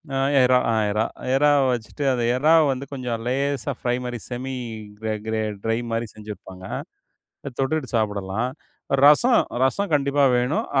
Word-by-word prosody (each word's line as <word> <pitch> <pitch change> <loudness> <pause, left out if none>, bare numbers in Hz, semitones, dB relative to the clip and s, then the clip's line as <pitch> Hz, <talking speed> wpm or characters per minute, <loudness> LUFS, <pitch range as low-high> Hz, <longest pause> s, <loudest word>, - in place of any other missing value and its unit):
அ - - 0 0.3
இறா 125 0 +5
ஆ - - +1 0.2
இறா 110 +2 +1 0.3
இறாவ 145 +1 +4
வச்சிட்டு, 120 +5 -5
அந்த 120 -2 -1
இறாவ 155 +5 +5
வந்து 130 +1 -4
கொஞ்சம் 125 -4 -3
லேசா 140 +1 -1
ஃப்ரை 120 0 0
மாரி 120 -1 -4
செமி 130 +1 -4 0.4
கிரே 110 0 -2
கிரே 110 0 0 0.2
டிரை 115 0 +1
மாரி 115 +1 -1
செஞ்சிருப்பாங்க. 105 -3 -10 0.8
அத 140 - -6
தொட்டுட்டு 135 -1 -1
சாப்பிடலாம். 105 +2 -1 0.5
ரசம் 225 - +6 0.2
ரசம் 200 +9 0
கண்டிப்பா 140 0 +2
வேணும். 125 +5 0
125 Hz, 145 wpm, -23 LUFS, 115-140 Hz, 0.8 s, ரசம்